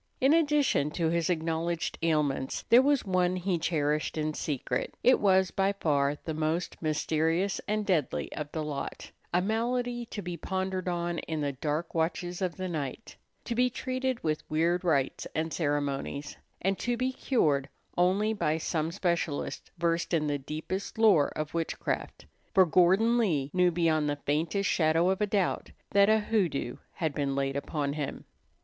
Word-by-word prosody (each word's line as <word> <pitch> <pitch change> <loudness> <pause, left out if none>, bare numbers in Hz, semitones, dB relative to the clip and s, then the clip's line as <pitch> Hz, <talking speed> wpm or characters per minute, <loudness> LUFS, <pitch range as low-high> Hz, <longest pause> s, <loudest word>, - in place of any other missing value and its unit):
In 270 +3 +4
addition 295 - +3
to 165 -2 +2
his 170 0 0
acknowledged 165 0 -1
ailments, 150 -5 0
there 240 +2 +8
was 280 -2 +2
one 185 -1 +2
he 180 -1 -1
cherished 150 -2 0
in 155 0 -1
secret. 135 -5 -3
It 255 - +5
was 190 -2 +3
by 195 +1 +1
far 145 -6 +1
the 160 - -2
most 155 +3 -2
mysterious 160 +4 0
and 210 0 0
deadly 150 - 0
of 150 -1 -5
the 155 - -3
lot, 145 -2 -5 0.2
a 180 +1 +2
malady 240 +3 -1
to 205 - -6
be 175 -1 -4
pondered 190 0 -3
on 175 -1 -1
in 160 -2 -3
the 145 -1 0
dark 150 +5 -3
watches 175 +2 -1
of 180 -2 -1
the 185 -1 -4
night, 155 - -5 0.3
to 235 - -2
be 250 +2 +3
treated 255 0 -2
with 155 -1 0
weird 170 +3 +1
rites 140 -6 0
and 160 0 -1
ceremonies, 145 -2 -2 0.3
and 195 +1 +1
to 245 -1 -1
be 255 +2 0
cured 145 - +1 0.3
only 195 +5 +2
by 160 -7 0
some 160 0 -1
specialist 170 -5 -2
versed 170 0 0
in 155 -2 +1
the 145 -1 -1
deepest 155 +9 -5
lore 205 -10 +5
of 155 0 -3
witchcraft; 165 -1 -3 0.3
for 190 -1 +7
Gordon 190 +8 +4
Lee 150 - +1
knew 180 -1 +4
beyond 160 -3 +1
the 145 - 0
faintest 165 +7 0
shadow 165 +2 +3
of 190 - -2
a 210 - +2
doubt 200 -2 0 0.2
that 200 +1 +5
a 220 - +6
hoodoo 200 -10 0 0.2
had 160 -5 -2
been 140 -1 -1
laid 135 0 -1
upon 140 0 -2
him. 145 -2 -4
170 Hz, 170 wpm, -29 LUFS, 150-195 Hz, 0.3 s, there